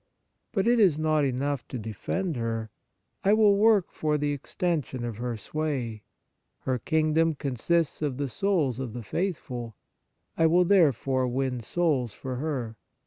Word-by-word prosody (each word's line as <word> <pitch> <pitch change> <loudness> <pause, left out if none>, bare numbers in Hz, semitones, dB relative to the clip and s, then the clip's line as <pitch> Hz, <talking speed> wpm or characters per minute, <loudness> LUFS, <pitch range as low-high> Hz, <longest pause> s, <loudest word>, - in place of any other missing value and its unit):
But 195 -1 0
it 240 0 +4
is 185 -9 +5
not 155 -1 +2
enough 135 0 -1
to 130 - -5
defend 120 - -3
her: 115 -2 -3 0.5
I 200 - +4
will 215 -2 +5
work 210 -2 +4
for 150 -1 0
the 145 0 0
extension 145 -3 -2
of 115 -3 -5
her 120 -1 -3
sway. 125 -3 -3 0.6
Her 130 -1 -1
kingdom 160 +3 +2
consists 145 +5 0
of 145 -4 -1
the 140 0 -1
souls 145 - 0
of 125 -4 -4
the 120 -1 -6
faithful: 125 - -3 0.6
I 165 - +4
will 175 +2 +4
therefore 135 - +3
win 130 0 -1
souls 130 -2 0
for 130 -1 -5
her. 125 -6 -3
145 Hz, 150 wpm, -27 LUFS, 125-165 Hz, 0.6 s, is